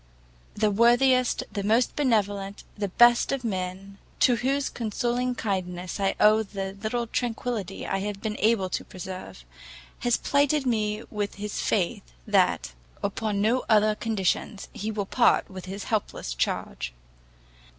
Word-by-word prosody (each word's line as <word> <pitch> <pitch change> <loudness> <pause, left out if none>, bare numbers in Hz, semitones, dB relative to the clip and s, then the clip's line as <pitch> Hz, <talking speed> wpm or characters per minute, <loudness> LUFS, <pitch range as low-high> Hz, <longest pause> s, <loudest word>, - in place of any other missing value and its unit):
The 210 0 +2
worthiest, 245 +3 +4
the 205 - -3
most 225 +4 +2
benevolent, 205 -7 0
the 205 -1 -2
best 240 +5 +5
of 275 -2 -2
men, 195 -1 -4 0.2
to 245 -2 +5
whose 270 +3 0
consoling 245 +2 -1
kindness 185 -4 -3
I 195 -1 +1
owe 215 +1 +6
the 195 -2 -5
little 235 +2 -1
tranquillity 225 -4 -3
I 195 - -1
have 200 0 -4
been 210 0 -3
able 215 -3 +3
to - - -2
preserve, 185 - -8 0.5
has 240 -2 +2
plighted 285 0 +2
me 215 -3 0 0.3
his 205 +1 -4
faith, 170 - -1
that, 65 - +2 0.3
upon 200 0 -1
no 235 +5 +2
other 215 -1 +5
conditions, 210 -2 -2
he 210 - -4
will 210 -2 -2
part 240 +4 +3
with 185 -1 -8
his 195 +2 -6
helpless 210 - -2
charge. - - -2
210 Hz, 140 wpm, -26 LUFS, 195-235 Hz, 0.5 s, owe